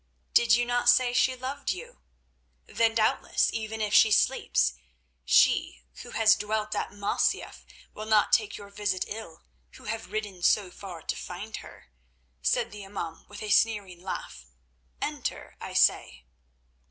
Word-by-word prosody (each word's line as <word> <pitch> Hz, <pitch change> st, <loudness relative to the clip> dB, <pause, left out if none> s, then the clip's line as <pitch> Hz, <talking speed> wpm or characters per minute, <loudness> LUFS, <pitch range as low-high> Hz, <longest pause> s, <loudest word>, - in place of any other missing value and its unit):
"Did 235 Hz, -1 st, +5 dB
you 240 Hz, 0 st, +1 dB
not 245 Hz, 0 st, +2 dB
say 245 Hz, 0 st, +4 dB
she 255 Hz, +1 st, +3 dB
loved 260 Hz, +2 st, -5 dB
you? 485 Hz, +1 st, -5 dB, 0.7 s
Then 225 Hz, -1 st, +1 dB
doubtless, 220 Hz, -1 st, +1 dB
even 220 Hz, 0 st, -4 dB
if 210 Hz, -1 st, -1 dB
she 220 Hz, -, +7 dB
sleeps, 65 Hz, -, +2 dB, 0.5 s
she, -, -, +3 dB, 0.2 s
who -, -, -10 dB
has 220 Hz, -1 st, +4 dB
dwelt 215 Hz, 0 st, -2 dB
at -, -, -2 dB
Masyaf 205 Hz, 0 st, -1 dB, 0.3 s
will 215 Hz, 0 st, -7 dB
not 215 Hz, -1 st, +3 dB
take 215 Hz, -3 st, +2 dB
your 200 Hz, 0 st, -12 dB
visit 200 Hz, -2 st, -1 dB
ill, 205 Hz, -7 st, -8 dB, 0.3 s
who -, -, -14 dB
have 225 Hz, +1 st, -5 dB
ridden 205 Hz, -4 st, -4 dB
so 190 Hz, +1 st, +2 dB
far 180 Hz, -5 st, -9 dB
to -, -, -2 dB
find 200 Hz, +5 st, -7 dB
her," -, -, -13 dB, 0.5 s
said 60 Hz, -, +1 dB
the 210 Hz, 0 st, -9 dB
imaum 195 Hz, -4 st, -7 dB
with 205 Hz, +1 st, -9 dB
a 210 Hz, -, -3 dB
sneering 200 Hz, -5 st, +2 dB
laugh. 70 Hz, -, -7 dB, 0.6 s
"Enter, -, -, -4 dB
I -, -, -7 dB
say." -, -, +2 dB
210 Hz, 155 wpm, -27 LUFS, 190-225 Hz, 0.7 s, she